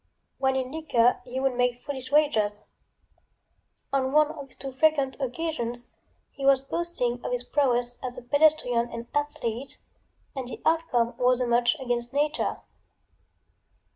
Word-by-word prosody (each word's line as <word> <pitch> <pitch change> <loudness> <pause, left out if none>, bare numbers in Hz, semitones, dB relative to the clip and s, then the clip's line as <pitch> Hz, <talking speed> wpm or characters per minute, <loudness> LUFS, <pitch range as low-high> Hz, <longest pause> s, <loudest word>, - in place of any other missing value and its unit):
When 265 0 +2
in 260 -1 -2
liquor 270 -6 +2
he 255 +1 -4
would 265 -1 +1
make 245 0 0
foolish 265 -2 -6
wagers. 285 -9 +3 1.4
On 265 -1 +1
one 305 0 +5
of 285 -3 -8
these - - -21
too 270 - -5
frequent 280 -1 +2
occasions 250 -3 -3 0.5
he 275 - -9
was 275 -1 +6
boasting 270 -6 -2
of - - -3
his 245 0 -1
prowess 245 -3 +1
as 250 -1 -5
a - - -8
pedestrian 265 -4 +3
and 230 0 -6
athlete, 275 -4 -3 0.6
and 260 -2 -4
the 240 - -7
outcome 260 -8 +2
was 250 0 +3
a 250 - +1
match 240 +3 +3
against 245 -2 -2
nature. 295 +1 0
260 Hz, 145 wpm, -27 LUFS, 245-290 Hz, 1.4 s, was